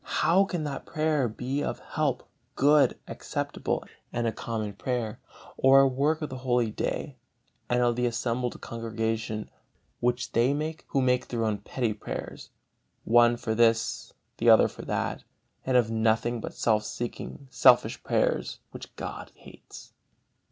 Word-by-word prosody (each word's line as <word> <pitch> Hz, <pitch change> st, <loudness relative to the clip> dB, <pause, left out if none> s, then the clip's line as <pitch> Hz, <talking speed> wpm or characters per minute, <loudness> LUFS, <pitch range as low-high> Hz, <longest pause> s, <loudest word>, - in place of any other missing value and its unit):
How 175 Hz, +5 st, +5 dB
can 175 Hz, -5 st, -3 dB
that 145 Hz, -2 st, -5 dB
prayer 155 Hz, -4 st, +1 dB
be 130 Hz, +6 st, -3 dB
of -, -, -2 dB
help, 145 Hz, -5 st, -2 dB, 0.3 s
good, 145 Hz, +1 st, +4 dB
acceptable -, -, -3 dB, 0.3 s
and 120 Hz, 0 st, -1 dB
a 115 Hz, -, +1 dB
common 110 Hz, -2 st, -4 dB
prayer, 120 Hz, -1 st, -3 dB, 0.4 s
or 135 Hz, +1 st, +7 dB
a 135 Hz, -, +5 dB
work 145 Hz, +5 st, 0 dB
of 150 Hz, -, -3 dB
the 130 Hz, -, -6 dB
Holy 120 Hz, -3 st, +1 dB
Day 130 Hz, +5 st, -3 dB, 0.5 s
and 125 Hz, 0 st, +2 dB
of 120 Hz, -1 st, +2 dB
the 125 Hz, 0 st, +1 dB
assembled 120 Hz, +1 st, -2 dB
congregation, 115 Hz, -1 st, -3 dB, 0.5 s
which 125 Hz, 0 st, 0 dB
they 120 Hz, +5 st, +2 dB
make 155 Hz, +2 st, -4 dB
who 135 Hz, -, +1 dB
make 125 Hz, 0 st, +2 dB
their 115 Hz, -2 st, -1 dB
own 105 Hz, -2 st, -1 dB
petty 115 Hz, +2 st, -2 dB
prayers, 105 Hz, -, -7 dB, 0.5 s
one 120 Hz, +1 st, +5 dB
for 110 Hz, -2 st, -2 dB
this, 115 Hz, 0 st, +2 dB, 0.3 s
the -, -, +3 dB
other -, -, +7 dB
for -, -, -10 dB
that, -, -, -2 dB, 0.4 s
and 130 Hz, -1 st, +4 dB
have 115 Hz, -2 st, +2 dB
nothing 115 Hz, +1 st, +1 dB
but -, -, -7 dB
self 110 Hz, -2 st, +2 dB
seeking, 120 Hz, +4 st, -6 dB
selfish -, -, +4 dB
prayers, -, -, 0 dB
which -, -, -10 dB
God -, -, -7 dB
hates? -, -, -14 dB
120 Hz, 150 wpm, -27 LUFS, 115-135 Hz, 0.5 s, or